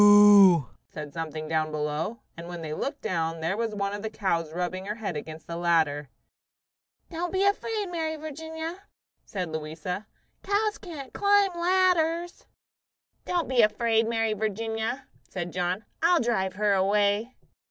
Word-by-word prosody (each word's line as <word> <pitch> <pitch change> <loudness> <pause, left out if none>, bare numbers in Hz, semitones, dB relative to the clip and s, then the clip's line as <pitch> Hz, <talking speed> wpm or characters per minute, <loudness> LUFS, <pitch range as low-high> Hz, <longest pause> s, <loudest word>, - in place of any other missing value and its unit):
"Moo!" 205 -5 +8 0.3
said 150 -2 -8
something 155 -1 -4
down 155 0 0
below; 155 +8 -3
and 170 +1 -8
when 175 -1 -6
they 155 -1 -4
looked, 280 - -4
there 165 +1 -1
was 225 -1 -2
one 200 0 -1
of 205 - -4
the 220 - -3
cows 170 -7 -1
rubbing 180 +2 -3
her 210 - -2
head 205 -7 -4
against 155 +1 -7
the 170 - -6
ladder. 160 -5 +1 1.0
"Don't 345 +1 -3
be 380 +1 +1
afraid, 420 +1 0
Mary 325 -3 -2
Virginia," 320 +4 -6 0.4
said 185 -4 -4
Louisa. 160 +6 -5 0.3
"Cows 415 +1 0
can't 300 -8 -9
climb 405 -1 +4
ladders." 345 -1 +1 0.8
"Don't 350 -2 0
be 255 -2 +4
afraid, 225 +1 +2
Mary 225 -1 +1
Virginia," 220 +4 -2 0.2
said 175 -2 -4
John. 180 +3 -1 0.2
"I'll 340 +1 +5
drive 190 -6 0
her 205 +1 +2
away." 205 +4 +2
210 Hz, 145 wpm, -27 LUFS, -, 1.0 s, Moo